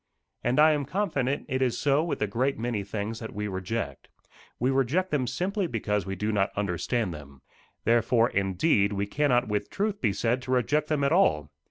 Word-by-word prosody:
And 125 +4 +1
I 155 +1 +7
am 145 -2 0
confident 145 -6 -1
it 130 +1 -1
is 125 -3 +1
so 145 +1 +2
with 165 -9 -2
a - - +3
great 130 +7 0
many 115 -3 -2
things 105 +3 -4
that 110 - -8
we 105 0 -2
reject. 95 +4 -4 0.5
We 125 +3 +2
reject 135 +8 +1
them 135 -4 0
simply 190 - -1
because 105 - -2
we 95 - -3
do 105 +3 -1
not 100 -2 +1
understand 100 +1 -1
them. 70 -3 -12 0.4
Therefore, 115 +1 +3
indeed, 100 - +2
we 100 0 -1
cannot 125 +1 +1
with 105 -1 -2
truth 205 0 -2
be 110 - +2
said 120 +5 0
to 125 +1 -6
reject 145 +5 +1
them 150 -2 +1
at 140 - +2
all. 75 - +3
120 Hz, 195 wpm, -27 LUFS, 100-140 Hz, 0.5 s, I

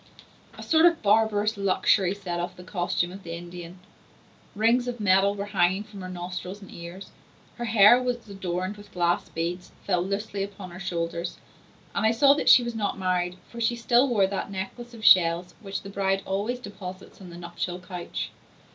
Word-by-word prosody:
A - - -8
sort 320 +1 +5
of 335 -6 +1
barbarous 215 0 +3
luxury 195 -1 +2
set 180 -4 -4
off 175 - -4
the 180 - -11
costume 175 -1 -1
of 195 +2 -9
the 165 -2 -7
Indian; 175 +1 -9 0.8
rings 230 +4 +3
of 245 -1 -4
metal 200 0 +3
were 200 0 -4
hanging 185 +4 +2
from 210 -2 -11
her 185 - -6
nostrils 180 +2 -6
and 195 - -13
ears; 175 +3 -9 0.5
her 240 - -3
hair, 225 +2 +7
which 250 -1 0
was 220 - -20
adorned 185 0 -3
with 205 0 -14
glass 175 -1 0
beads, 175 +2 -4
fell 180 -3 +1
loosely 200 +2 -3
upon 195 -2 -6
her 175 - -9
shoulders; 170 -2 -3 0.6
and - - -1
I 220 - +5
saw 275 +5 +5
that 295 - +1
she 245 - +8
was 235 0 -3
not 210 -4 -2
married, 180 -1 -1
for 235 - -7
she 235 +1 +2
still 240 +3 +3
wore 210 -5 +3
that 195 0 -3
necklace 200 +5 -6
of 220 - -8
shells 175 0 +5
which 195 -2 -5
the 195 - -8
bride 195 -1 0
always 205 +6 -1
deposits 195 -4 -9
on 185 - -10
the 170 - -10
nuptial 175 +1 -4
couch. 180 -1 -6
195 Hz, 190 wpm, -26 LUFS, 180-215 Hz, 0.8 s, she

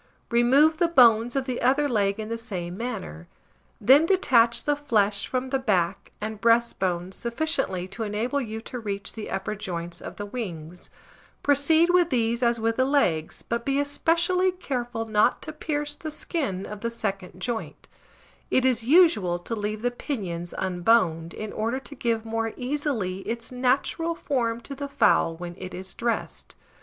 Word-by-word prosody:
Remove 270 +7 +4
the 345 - +3
bones 240 -6 +5
of 270 -1 0
the 255 -2 -3
other 275 +4 +3
leg 205 -4 +1
in 215 - -4
the 230 - -3
same 185 -7 -5
manner; 195 - -6 0.5
then 265 +8 +6
detach 240 -11 +3
the 295 - +1
flesh 210 -8 +1
from 255 0 -2
the 270 - +1
back 190 -9 0
and 215 0 -5
breast 235 0 +3
bone 180 -1 -1
sufficiently 235 - -1
to 195 +5 -8
enable 225 +6 -1
you 220 -3 -5
to 250 +2 -7
reach 200 -3 -4
the 220 - -7
upper 195 +2 -3
joints 175 -5 -5
of - - -8
the 205 - -5
wings; 180 -7 -6 0.5
proceed 315 +4 +4
with 355 -1 +4
these 235 -2 0
as 235 -1 +2
with 225 0 0
the 260 - +4
legs, 220 - 0
but 235 0 -2
be 275 +2 +1
especially 335 +6 +2
careful 245 -10 -4
not 215 -1 +2
to 310 - -6
pierce 295 -1 -3
the 310 +1 -7
skin 275 - -3
of 210 -1 -8
the 235 - -1
second 195 -5 -4
joint: 235 -3 -4 0.6
it 260 - +2
is 250 -3 +3
usual 255 - +4
to 175 +6 -6
leave 215 0 -3
the 245 - +1
pinions 185 - -4
unboned, 180 -3 +2
in 215 +2 -6
order 230 +4 -1
to 275 - -10
give 230 -4 -1
more 225 0 -2
easily 250 -8 -2
its 230 +1 -4
natural 265 +7 0
form 235 -7 -1
to 275 - -8
the 280 +1 -5
fowl 165 -10 +3
when 175 +1 -7
it 185 -1 -7
is 190 +1 -8
dressed. 235 -1 -3
230 Hz, 170 wpm, -25 LUFS, 200-275 Hz, 0.6 s, then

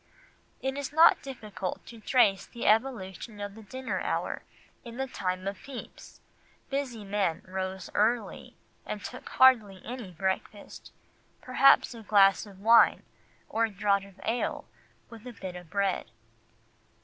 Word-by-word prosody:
It 265 +1 -2
is 285 - -4
not 320 +3 +6
difficult 215 -8 -6
to 230 - -11
trace 210 -4 +3
the 235 - -7
evolution 215 -3 0
of 205 -1 -5
the 220 - -12
dinner 260 +5 -4
hour; - - -2 0.4
in 235 0 -9
the 265 - -1
time 185 -7 -3
of 200 -1 -4
Pepys, 270 -3 -10 0.5
busy 265 -6 -3
men 195 -5 -1
rose 190 0 -4
early 230 +3 0 0.3
and - - -6
took - - -8
hardly 225 -7 +5
any 240 -4 -6
breakfast, 190 +3 -4 0.5
perhaps 260 +1 +4
a 230 - -10
glass 200 -1 +4
of 195 -1 -14
wine 230 +2 +6 0.4
or 230 +1 +1
a - - -4
draught 200 -1 +1
of 200 -1 -17
ale 235 +2 -1 0.5
with 230 +1 -11
a 245 - -7
bit 190 -4 -7
of 175 -2 -10
bread. 200 - -1
210 Hz, 145 wpm, -29 LUFS, 195-245 Hz, 0.5 s, not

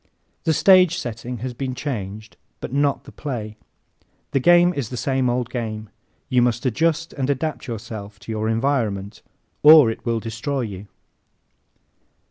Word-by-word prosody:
The 160 - +3
stage 185 -1 +5
setting 120 -3 -5
has 125 - -4
been 130 +1 -4
changed 110 -6 -5 0.2
but - - -6
not 140 0 +1
the - - -13
play. 110 -7 -5 0.8
The 135 - +2
game 175 +4 +5
is 140 -9 -3
the 125 - -6
same 130 0 0
old 125 0 -1
game 110 -3 -4 0.4
you 125 -1 +3
must 120 +1 0
adjust 165 +6 0
and 135 -1 -2
adapt 145 +2 -2
yourself 110 -3 -7
to 115 - -7
your 110 0 -1
environment 110 -5 -1 0.4
or 150 -6 +8
it - - -8
will 115 -1 0
destroy 115 +5 -3
you. 100 -3 -6
125 Hz, 150 wpm, -22 LUFS, 110-140 Hz, 0.8 s, or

